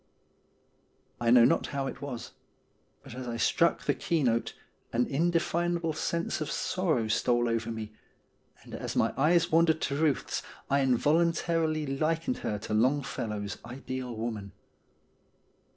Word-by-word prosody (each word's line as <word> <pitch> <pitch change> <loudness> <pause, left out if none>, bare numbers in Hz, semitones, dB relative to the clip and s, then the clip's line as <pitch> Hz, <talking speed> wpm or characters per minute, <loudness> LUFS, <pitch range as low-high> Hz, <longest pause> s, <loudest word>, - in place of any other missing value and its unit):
I 120 - +1
know 120 0 +8
not - - +2
how 140 -1 -2
it 135 - -6
was, 135 -5 -6 0.7
but - - -10
as 125 0 -6
I 115 -1 -3
struck 170 +8 +2
the - - +2
key 165 -3 0
note 115 -2 0 0.4
an 120 +1 +2
indefinable 170 +2 0
sense 170 +1 -2
of 155 - -2
sorrow 160 -12 0
stole 120 +2 +2
over 115 0 -1
me, 110 -1 -5 0.7
and - - -13
as - - -4
my - - +2
eyes 165 +5 +3
wandered 160 0 +4
to 140 - -1
Ruth's 150 -2 0 0.3
I 140 - +4
involuntarily 155 +4 +2
likened 160 - -1
her 105 - -2
to 105 +1 -5
Longfellow's 110 -5 -1
ideal 125 0 -6
woman. 110 -3 -4
135 Hz, 135 wpm, -29 LUFS, 115-165 Hz, 0.7 s, know